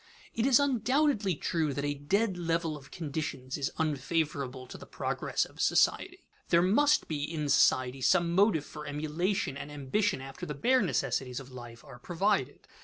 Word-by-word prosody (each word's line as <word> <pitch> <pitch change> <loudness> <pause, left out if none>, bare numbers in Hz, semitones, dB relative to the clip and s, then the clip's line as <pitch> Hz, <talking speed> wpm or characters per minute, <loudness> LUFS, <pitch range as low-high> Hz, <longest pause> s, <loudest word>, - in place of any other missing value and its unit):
_ - - -29 0.3
It 230 +3 +1
is 265 -2 +6
undoubtedly 260 - +1
true 155 -2 -1
that 140 - -2
a 145 - 0
dead 190 +9 0
level 165 -2 -1
of 145 -1 -12
conditions 145 -5 -5
is 140 -2 -1
unfavorable 145 -3 -2
to - - -11
the - - -11
progress - - -2
of - - -9
society. - - +1 0.2
There 170 0 +4
must 290 +11 +3
be 150 -2 -3
in 150 -1 -3
society 130 -1 +3
some 170 +4 +3
motive 190 -5 +3
for 150 -1 -9
emulation 155 +2 -2
and 145 +1 -7
ambition 150 +7 -1
after 135 0 -8
the 150 - -4
bare 255 - +3
necessities 135 - -1
of 135 -1 -12
life 120 -2 -10
are 125 - -12
provided. 180 -1 -1
155 Hz, 175 wpm, -30 LUFS, 135-195 Hz, 0.3 s, is